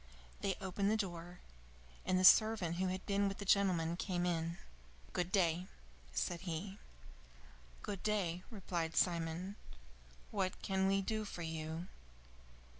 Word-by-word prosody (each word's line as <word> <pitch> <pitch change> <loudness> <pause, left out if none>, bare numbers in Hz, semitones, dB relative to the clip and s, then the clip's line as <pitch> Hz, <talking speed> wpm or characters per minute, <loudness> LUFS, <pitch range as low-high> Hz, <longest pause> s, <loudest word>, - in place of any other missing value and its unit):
They 195 -2 0
opened 195 +1 0
the 220 - +3
door, 175 -3 -4 0.7
and 185 - +3
the 185 - +4
servant 200 -5 +6
who 185 +1 +1
had 185 +1 -3
been 200 0 +2
with 195 - -3
the 200 - -6
gentleman 180 -4 +3
came 175 -1 -1
in. 170 -1 -1 0.6
"Good 180 0 -1
day," 180 -2 +2 0.4
said 170 - -1
he. 190 +3 -4 1.0
"Good 200 -3 -4
day," 185 -5 0
replied 175 -6 -3
Simon. 175 +3 0 0.7
"What 190 -3 -1
can 190 0 +2
we 195 0 +2
do 215 +2 -1
for 180 -4 -6
you?" 160 +1 -4
185 Hz, 135 wpm, -37 LUFS, 170-195 Hz, 1.0 s, servant